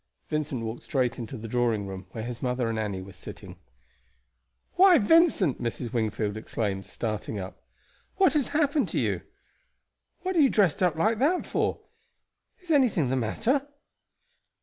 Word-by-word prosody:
Vincent 150 -6 -2
walked 110 +2 -5
straight 125 -4 -1
into 120 +2 -6
the 115 +1 -7
drawing 115 -3 0
room, 95 -1 -7
where 110 +3 -6
his 120 0 -6
mother 125 -2 0
and 115 -1 -2
Annie 100 -3 -3
were 95 0 -12
sitting. - - -11 1.1
"Why, 370 -1 +7
Vincent!" 245 - +4
Mrs. 120 0 -4
Wingfield 110 -2 -1
exclaimed, 100 -3 -3
starting 110 -1 -4
up, 95 0 -8 0.5
"what 380 -1 +4
has 295 -4 +1
happened 295 -1 +1
to - - -1
you? - - 0 1.0
What 375 0 -1
are - - +3
you 275 - +6
dressed 195 -9 +2
up 180 -4 +3
like 215 +7 +1
that 325 +7 +2
for? - - -1 0.8
Is 350 - -5
anything 230 - +3
the - - +2
matter?" 230 - 0
125 Hz, 155 wpm, -27 LUFS, -, 1.1 s, Why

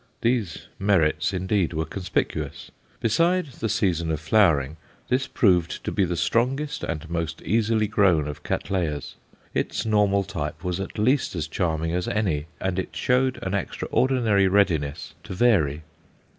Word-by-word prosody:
Those 115 - -1
merits, 90 -5 +2
indeed, 95 -1 0
were 80 0 -1
conspicuous. 90 +3 -3 0.3
Besides 165 - +1
the 110 - -1
season 90 -7 0
of 80 -2 -1
flowering, 80 -4 +3 0.3
this 130 +1 +1
proved 90 - +2
to - - -3
be 95 - +2
the 90 -1 -2
strongest 135 - 0
and 80 -1 -4
most 80 -1 -3
easily 110 +2 +2
grown 95 -8 +3
of 75 - -6
Cattleyas. 85 -6 -2 0.4
Its - - -1
normal 105 -2 +3
type 80 -4 -5
was 90 0 -2
at 95 - -6
least 125 +1 +1
as 80 -3 -2
charming 80 -1 -1
as 90 0 -1
any, 85 -8 -1
and 95 -1 -1
it - - -5
showed 130 +1 +1
an 95 - -3
extraordinary 105 +1 +1
readiness 80 -6 +1
to 95 - -7
vary. 80 -10 +2
95 Hz, 145 wpm, -24 LUFS, 80-110 Hz, 0.4 s, flowering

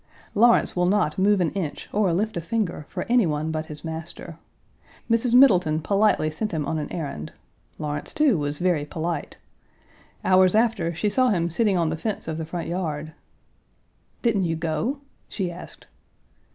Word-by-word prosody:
Lawrence 235 +3 +4
will 180 0 +2
not 190 -4 +1
move 200 +1 +4
an 165 - +1
inch 175 -7 -4
or 205 -3 +2
lift 210 +6 -1
a 170 - -2
finger 170 -5 -2
for - - -4
any 240 -5 +4
one 155 +1 -1
but 155 0 -3
his 150 +1 -9
master. 160 0 -7 0.7
Mrs. 230 +1 +2
Middleton 180 - +5
politely 200 -3 +2
sent 210 +6 -4
him 155 -3 -1
on 160 - -2
an 150 - -5
errand; 140 - -5 0.4
Lawrence 150 -1 -4
too, 300 -7 +3
was 145 0 -2
very 175 -4 +1
polite; 160 +1 -4 0.9
hours 185 +1 +5
after, 220 -7 +1
she 210 - -1
saw 255 +5 +3
him 170 -5 0
sitting 205 +1 +2
on 165 -2 +1
the 160 - -1
fence 210 +2 -4
of 160 0 -3
the 160 - -3
front 170 +1 -5
yard. 160 -3 -3 1.1
"Didn't 210 -6 +2
you 165 -1 0
go?" 170 - -2 0.3
she 185 -4 -3
asked. 175 - -11
175 Hz, 170 wpm, -24 LUFS, 155-210 Hz, 1.1 s, Middleton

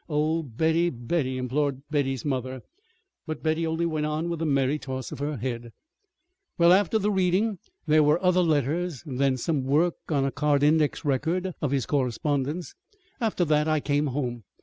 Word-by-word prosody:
"Oh, 155 +2 +1
Betty! 160 +6 +1
Betty!" 130 +1 -2
implored 135 +2 -1
Betty's 135 -5 -1
mother. 130 -2 -3 0.6
But 155 -1 -5
Betty 160 +1 +1
only 160 +1 0
went 155 -2 -1
on 155 +3 -2
with 170 -1 -3
a 165 - 0
merry 140 +1 +1
toss 130 -2 -5
of 150 - -7
her 145 0 -2
head: 120 -1 -5 0.8
"Well, 170 +1 +6
after 200 +3 +3
the 210 0 0
reading 190 +2 +1 0.3
there 155 0 +4
were 150 +2 +4
other 180 0 +4
letters, 160 0 0
then 135 -2 0
some 145 +3 -1
work 155 +6 +2
on 140 -4 +1
a 135 - 0
card 145 0 +1
index 150 +1 +2
record 170 +7 0
of 150 - 0
his 135 -2 0
correspondence. 145 +4 -1 0.5
After 220 -7 0
that 150 0 +2
I 155 -1 +2
came 145 +1 0
home. 125 -4 -3
150 Hz, 170 wpm, -26 LUFS, 135-165 Hz, 0.8 s, Well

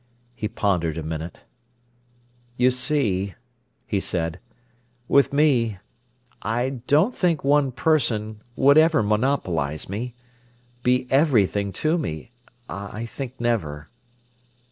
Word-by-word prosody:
He 115 -3 -3
pondered 90 -7 0
a 80 - -4
minute. 80 +2 -6 1.2
"You 125 +1 +4
see," 125 -8 0 0.5
he 100 - -1
said, 85 -2 -1 0.7
"with 140 0 +4
me—I 120 -1 -2
don't 160 - +4
think 170 -8 0
one 140 -1 +3
person 115 -7 0
would 140 +3 +6
ever 160 -7 +4
monopolise 105 - 0
me—be 125 +2 -4
everything 110 - +3
to 155 - 0
me—I 115 - -7
think 130 +2 -7
never." 80 -12 -2
120 Hz, 95 wpm, -23 LUFS, 100-135 Hz, 1.2 s, would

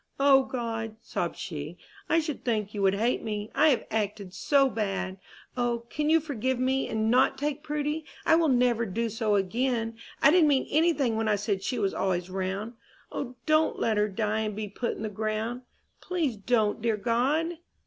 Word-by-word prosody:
"O 275 -1 +6
God," 225 -3 -4
sobbed 170 - -3
she, 155 +3 -6 0.3
"I 330 - +4
should 310 -3 -4
think 215 -4 -1
you 205 - -3
would 195 0 +3
hate 230 +5 +1
me, 210 -1 -4
I 310 - +5
have 250 -6 +1
acted 205 -3 -2
so 275 +5 +3
bad! 195 -5 -3 0.4
O, 240 -1 -1
can 300 +1 0
you 325 +1 +6
forgive 260 -4 -2
me, 260 +1 +1
and 220 0 0
not 255 +2 +4
take 295 +1 -2
Prudy? 300 +1 -2 0.2
I - - +6
never 250 -7 +3
will 210 - -4
do 230 +4 -1
so 220 -1 0
again! 225 +3 -1 0.2
I 280 - +6
didn't 340 -2 +5
mean 270 -2 +2
any 325 +3 +4
thing 250 -7 0
when 225 0 0
I 210 - +3
said 205 -1 -1
she 245 +5 -2
was 200 -3 0
always 180 -1 -1
round. 190 +4 -3 0.4
O, 255 -2 -5
don't 310 0 +3
let 220 -2 +1
her 210 0 +3
die 215 +2 -1
and 215 -2 -2
be 215 0 -4
put 235 +4 -3
in - - -6
the - - -1
ground! 220 +3 -3 0.4
Please 330 -9 -1
don't, 215 +1 +1
dear 225 -1 +1
God! 280 +10 0
230 Hz, 195 wpm, -28 LUFS, 210-270 Hz, 0.4 s, O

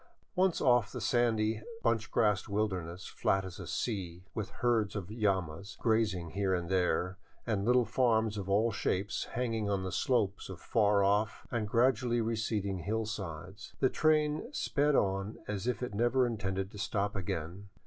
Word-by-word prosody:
Once 185 -1 +3
off 120 -4 +4
across - - -17
the - - -4
sandy, 110 -3 +1 0.2
bunch 115 -1 +1
grass 105 -4 +2
wilderness, 95 -4 -2
flat 95 0 0
as 95 - -8
a - - -7
sea, 90 -6 -3
with 110 -1 -3
herds 115 -5 0
of 100 -1 -5
llamas 100 -4 -1
grazing 105 -7 +1
here 100 -1 +1
and 85 -1 -3
there, 90 0 +1 0.3
and 105 -4 0
little 125 0 +4
farms 110 -2 +2
of 100 -2 -5
all 110 +4 +3
shapes 100 -1 -1
hanging 115 -4 -1
on 100 -2 0
the 95 - -3
slopes 105 -5 0
of 95 -3 -7
far 100 +3 +3
off 105 +3 +1
and 115 -3 -1
gradually 120 +1 +2
receding 110 -4 -1
hillsides, 100 -2 -4
the 130 - +4
train 155 - +2
sped 150 - +1
on 100 +1 0
as 105 +2 -3
if 125 0 -1
it 125 - -4
never 120 +4 +3
intended 95 -4 -2
to 105 - -10
stop 100 -1 -1
again. 90 +1 -4
105 Hz, 165 wpm, -32 LUFS, 95-115 Hz, 0.3 s, off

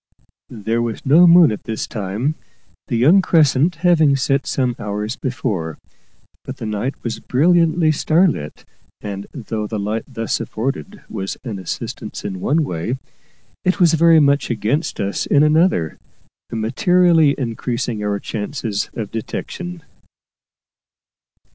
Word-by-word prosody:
There 115 +2 -2
was 115 -2 -4
no 160 +6 +6
moon 170 -4 +7
at 105 - -6
this 110 -1 -3
time, 105 +7 -2 0.5
the 115 - -1
young 160 +12 +5
crescent 160 -1 +3
having 160 -5 +5
set 135 0 0
some 125 -3 0
hours 105 +3 -3
before; 105 - -3 0.7
but - - -7
the - - -6
night 110 +6 -2
was 115 -2 -3
brilliantly 165 +3 +3
starlit, 155 - 0 0.3
and, 100 -1 -6
though 110 -5 -4
the 110 - -4
light 105 +2 -2
thus 115 -4 -2
afforded 135 - -4
was 95 0 -5
an 110 -7 -5
assistance 95 - -6
in 95 -2 -4
one 155 +3 +2
way, 100 - -3 0.7
it 185 +2 +1
was 170 -3 +5
very 165 0 +6
much 140 -1 +2
against 120 +8 -1
us 100 0 -2
in 145 0 +4
another, 155 - +2 0.5
materially 160 +7 +3
increasing 115 -3 -3
our 100 -1 -1
chances 105 -1 -3
of 110 -3 -5
detection. 175 +9 -6
125 Hz, 130 wpm, -19 LUFS, 105-160 Hz, 0.7 s, moon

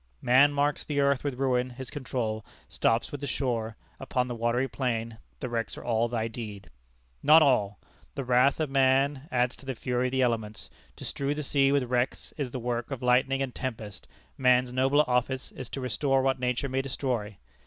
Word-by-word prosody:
"Man 130 - +5
marks 145 0 0
the 145 -2 -2
earth 140 -1 +2
with 140 -3 -2
ruin: 130 -2 +1
his 125 0 -8
control 115 -6 -3 0.2
Stops 115 +1 0
with 145 - -6
the 145 - -3
shore: 115 -4 -2 0.2
upon 125 -1 -1
the 125 - -4
watery 120 +3 0
plain 115 -3 -3 0.2
The 130 - -2
wrecks 115 -2 -3
are - - -8
all 115 0 +1
thy 115 -1 -2
deed." 105 -5 -8 0.5
Not 155 +2 +7
all! 105 -8 +2 0.4
The 140 - -3
wrath 125 +3 +3
of 155 -3 -1
man 135 +1 +2
adds 125 0 +1
to - - -14
the 130 - -2
fury 125 +1 -1
of - - -4
the 130 0 +2
elements. 110 -3 -2 0.2
To - - -9
strew 140 +1 -2
the 150 - -3
sea 135 0 +3
with 140 -2 +3
wrecks 125 0 -1
is 140 -4 -3
the 130 - -5
work 120 0 -3
of 135 -3 -5
lightning 130 +2 +3
and 130 -2 -5
tempest: 110 -6 -6 0.3
man's 125 -1 +3
nobler 135 +3 +3
office 125 +1 0
is 130 -3 -8
to 135 - -5
restore 130 +2 +1
what 135 -1 +1
nature 125 +2 -1
may 135 0 0
destroy. 125 -6 -3
125 Hz, 195 wpm, -28 LUFS, 120-135 Hz, 0.5 s, Not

